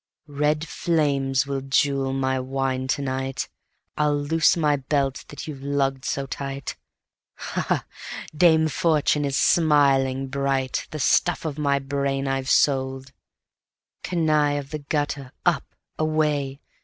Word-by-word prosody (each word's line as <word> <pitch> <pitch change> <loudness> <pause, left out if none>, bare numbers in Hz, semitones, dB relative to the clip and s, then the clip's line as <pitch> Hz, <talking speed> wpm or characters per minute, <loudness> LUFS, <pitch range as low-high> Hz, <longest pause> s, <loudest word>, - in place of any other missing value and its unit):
"Red 150 +2 0
flames 140 -5 +1
will 140 -1 -3
jewel 135 0 +1
my 130 0 0
wine 130 0 -2
to 140 +2 0
night; 130 0 -2 0.5
I'll 150 -1 +2
loose 160 +4 +3
my 150 -3 +3
belt 135 0 -1
that 145 - -8
you've 140 -3 -7
lugged 135 -1 -1
so 140 - -1
tight; 135 0 -5 0.6
Ha! - - -4
Ha! - - +1 0.5
Dame 160 -1 +5
Fortune 150 -2 +1
is 140 -1 0
smiling 140 -4 +3
bright; 135 -1 -1
The 155 - -6
stuff 165 +4 +2
of 155 -1 -3
my 140 -2 +2
brain 140 0 -1
I've 135 -1 -1
sold; 130 -1 +2 0.9
Canaille 155 -4 +1
of 140 -1 -6
the 155 - -3
gutter, 145 -2 -3
up! 170 -6 +2 0.3
Away! 150 -3 0
140 Hz, 130 wpm, -24 LUFS, 135-150 Hz, 0.9 s, Dame